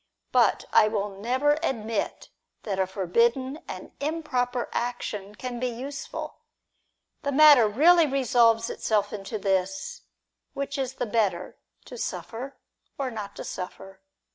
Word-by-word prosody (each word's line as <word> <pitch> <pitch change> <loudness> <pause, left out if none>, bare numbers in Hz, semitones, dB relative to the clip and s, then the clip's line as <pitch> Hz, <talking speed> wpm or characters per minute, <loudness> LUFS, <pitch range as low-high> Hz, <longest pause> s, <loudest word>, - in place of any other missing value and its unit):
But - - +3
I 215 - +7
will 210 -1 -1
never 255 +9 +1
admit 225 -8 -2 0.3
that 195 -3 -3
a 190 - +2
forbidden 235 - +1
and - - -8
improper 270 -5 -1
action 210 -4 -3
can 245 +1 -5
be 255 - 0
use 265 +4 -6
ful. - - -7 0.8
The 280 - -1
matter 285 -5 +8
really 320 +9 +5
resolves 240 -4 +3
itself 205 -1 0
into 210 +1 -4
this: 195 - -1 0.5
which 280 0 -3
is 260 -1 -2
the 245 - -2
better, 210 -6 -1 0.3
to - - -9
suffer, 260 - -5 0.4
or 270 -2 -2
not 210 -3 -6
to - - -6
suffer 195 +1 -7
235 Hz, 135 wpm, -26 LUFS, 205-275 Hz, 0.8 s, matter